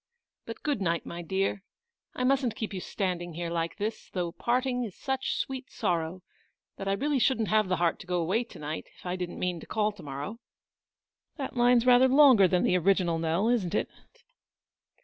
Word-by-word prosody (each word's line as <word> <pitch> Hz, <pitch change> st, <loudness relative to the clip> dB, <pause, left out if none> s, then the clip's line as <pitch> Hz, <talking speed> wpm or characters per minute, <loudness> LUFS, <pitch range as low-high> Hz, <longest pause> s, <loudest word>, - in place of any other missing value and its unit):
But, 230 Hz, -, -8 dB
good 290 Hz, -8 st, -1 dB
night, 170 Hz, -2 st, 0 dB
my 170 Hz, -, -6 dB
dear; 190 Hz, +3 st, -1 dB, 0.5 s
I 250 Hz, -, -2 dB
mustn't 260 Hz, -3 st, +2 dB
keep 220 Hz, -2 st, -4 dB
you 190 Hz, -, -3 dB
standing 175 Hz, -3 st, -3 dB
here, 170 Hz, 0 st, -3 dB
like 165 Hz, 0 st, -2 dB
this, 215 Hz, +1 st, -4 dB
though 175 Hz, -2 st, -2 dB
parting 250 Hz, +5 st, 0 dB
is 210 Hz, -6 st, -6 dB
such 265 Hz, -1 st, -2 dB
sweet 260 Hz, -1 st, -4 dB
sorrow, 170 Hz, +1 st, -2 dB, 0.5 s
that 195 Hz, -, -5 dB
I 195 Hz, -, +2 dB
really 280 Hz, +6 st, 0 dB
shouldn't 230 Hz, -3 st, +2 dB
have 215 Hz, -2 st, +3 dB
the 185 Hz, -, +2 dB
heart 170 Hz, -1 st, +1 dB
to 180 Hz, -, -11 dB
go 180 Hz, -1 st, 0 dB
away 190 Hz, +8 st, +1 dB
to -, -, -13 dB
night 150 Hz, +1 st, -5 dB
if -, -, -18 dB
I 180 Hz, 0 st, -2 dB
didn't 180 Hz, -1 st, -5 dB
mean 180 Hz, -2 st, -2 dB
to -, -, -12 dB
call 215 Hz, -1 st, +1 dB
to 205 Hz, -3 st, -14 dB
morrow. 145 Hz, +9 st, -6 dB, 1.0 s
That 275 Hz, -3 st, -4 dB
WAITING. -, -, -12 dB
109 -, -, +4 dB
line's 245 Hz, -1 st, +4 dB
rather 250 Hz, +1 st, +7 dB
longer 260 Hz, -7 st, +7 dB
than 180 Hz, 0 st, +2 dB
the 180 Hz, -, +3 dB
original, 175 Hz, -2 st, +2 dB
Nell, 165 Hz, +6 st, +1 dB
isn't 205 Hz, -6 st, +1 dB
it -, -, 0 dB
195 Hz, 205 wpm, -28 LUFS, 175-245 Hz, 1.0 s, rather